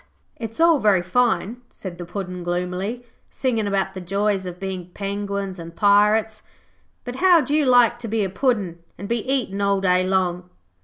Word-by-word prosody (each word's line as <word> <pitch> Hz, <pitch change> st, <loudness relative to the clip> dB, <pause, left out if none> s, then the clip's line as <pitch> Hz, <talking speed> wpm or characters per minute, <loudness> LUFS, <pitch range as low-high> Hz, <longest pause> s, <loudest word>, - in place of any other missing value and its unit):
'It's 225 Hz, +2 st, -7 dB
all 330 Hz, -2 st, +5 dB
very 205 Hz, -6 st, +3 dB
fine,' 240 Hz, +3 st, 0 dB
said 180 Hz, -3 st, -9 dB
the 175 Hz, -, -5 dB
Puddin' 180 Hz, -1 st, -5 dB
gloomily, 180 Hz, +7 st, -3 dB, 0.3 s
'singing 230 Hz, -5 st, -1 dB
about 195 Hz, -1 st, -1 dB
the 190 Hz, -, -7 dB
joys 195 Hz, +1 st, -1 dB
of 180 Hz, 0 st, -7 dB
being 190 Hz, -2 st, -5 dB
penguins 200 Hz, -1 st, -4 dB
and 165 Hz, 0 st, -9 dB
pirates, 210 Hz, +1 st, +3 dB, 0.6 s
but 245 Hz, 0 st, -6 dB
how'd 340 Hz, -6 st, +4 dB
you 300 Hz, -2 st, +2 dB
like 240 Hz, -2 st, +5 dB
to 235 Hz, -, -6 dB
be 220 Hz, -1 st, 0 dB
a 195 Hz, -, -1 dB
Puddin' 195 Hz, -7 st, 0 dB, 0.2 s
and 200 Hz, -, -7 dB
be 235 Hz, +2 st, 0 dB
eaten 215 Hz, -7 st, -1 dB
all 200 Hz, -1 st, +2 dB
day 180 Hz, -1 st, +2 dB
long?' 180 Hz, -1 st, -1 dB
200 Hz, 170 wpm, -22 LUFS, 185-230 Hz, 0.6 s, all